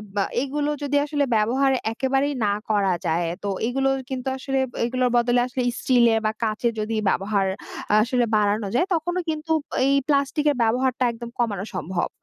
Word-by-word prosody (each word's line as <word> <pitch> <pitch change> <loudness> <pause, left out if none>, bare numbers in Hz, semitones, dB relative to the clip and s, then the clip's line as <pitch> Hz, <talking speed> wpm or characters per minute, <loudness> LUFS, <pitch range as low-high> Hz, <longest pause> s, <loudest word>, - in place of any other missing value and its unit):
বা 200 - +2 0.2
এগুলো 290 +2 -2
যদি 285 0 -1
আসলে 290 -1 0
ব্যবহার 250 +6 +2 0.2
একেবারেই 270 +4 0
না 200 - +2 0.2
করা 200 -3 +2
যায়। 170 +1 +1 0.2
তো 200 - -1 0.2
এগুলো 270 +2 +1 0.2
কিন্তু 260 -1 -4
আসলে 270 0 -2 0.3
এগুলোর 250 +1 +1
বদলে 240 +1 +3
আসলে 255 +1 -3 0.2
স্টিল 245 -2 +4
এর 225 - +2
বা 215 - +2
কাঁচের 225 +2 0
যদি 215 +1 -2
ব্যবহার 195 +1 +1 0.6
আসলে 245 +1 +1
বাড়ানো 210 0 +1
যায় 350 - +2
তখনও 350 +3 -1
কিন্তু 310 +1 -3 0.3
এই 275 - +3
প্লাস্টিক 285 0 +1
এর - - -2
ব্যবহারটা 255 +3 +1
একদম 235 0 -8
কমানো 205 -5 -1
সম্ভব। 185 -1 -2
245 Hz, 165 wpm, -23 LUFS, 215-275 Hz, 0.6 s, স্টিল